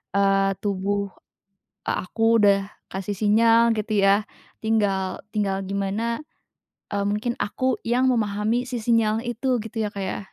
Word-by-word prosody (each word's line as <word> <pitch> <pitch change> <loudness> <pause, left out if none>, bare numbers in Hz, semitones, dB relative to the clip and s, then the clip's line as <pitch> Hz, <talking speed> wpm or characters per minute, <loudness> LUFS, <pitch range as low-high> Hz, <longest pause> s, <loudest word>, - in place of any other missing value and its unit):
eee, 195 0 +3
tubuh 200 0 -1 0.7
a 185 - -2
aku 225 +2 +3
udah 200 -1 +4 0.2
kasih 195 +1 -4
sinyal 225 +3 +4
gitu 215 -1 0
ya. 195 +1 +4 0.4
Tinggal 195 -4 0
tinggal 200 -2 -1
gimana, 200 +7 -2 0.7
eee, 200 -1 0
mungkin 210 +4 -1
aku 260 +2 -1
yang 250 +3 +2
memahami 220 0 +1
si 250 -1 -4
sinyal 225 -1 +2
itu 245 +1 0
gitu 225 +1 -4
ya, 210 - -2
Kak, 200 -1 -5
ya. 190 - -3
210 Hz, 140 wpm, -24 LUFS, 200-230 Hz, 0.7 s, udah